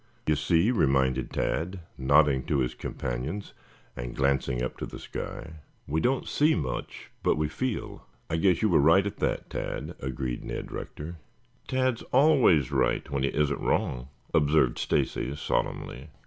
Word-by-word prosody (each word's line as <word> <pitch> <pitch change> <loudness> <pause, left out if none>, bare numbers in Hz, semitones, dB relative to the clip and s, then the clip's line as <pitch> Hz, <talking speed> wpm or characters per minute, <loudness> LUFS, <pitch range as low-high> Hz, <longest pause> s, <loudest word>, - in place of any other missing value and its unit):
"You 75 - +3
see," 80 - +3
reminded 65 - +2
Tad, 90 +3 -2
nodding 70 0 +4
to 75 - +1
his 65 -2 0
companions 65 +12 -4 0.4
and - - -6
glancing 70 -2 +1
up 65 - -3
to - - -4
the - - -8
sky. 80 -2 -7 0.3
"We 80 +3 -1
don't 130 +1 +1
see 150 +2 +3
much, 65 -7 -4
but - - +2
we 75 0 +1
feel. 110 - -4 0.2
I 80 - -1
guess 90 +3 +3
you 110 - +4
were 90 - +5
right 80 +7 +5
at 100 - -4
that, - - -2
Tad," - - -4
agreed 65 -1 -3
Ned - - -5
Rector. 80 +3 -6 0.5
"Tad's 130 -2 +1
always 130 - +5
right - - +1
when 70 -1 -1
he 70 - +2
isn't 75 -2 0
wrong," 60 0 0 0.3
observed 75 -5 +3
Stacy 70 - 0
solemnly. 70 -1 -2
75 Hz, 155 wpm, -28 LUFS, 65-90 Hz, 0.5 s, were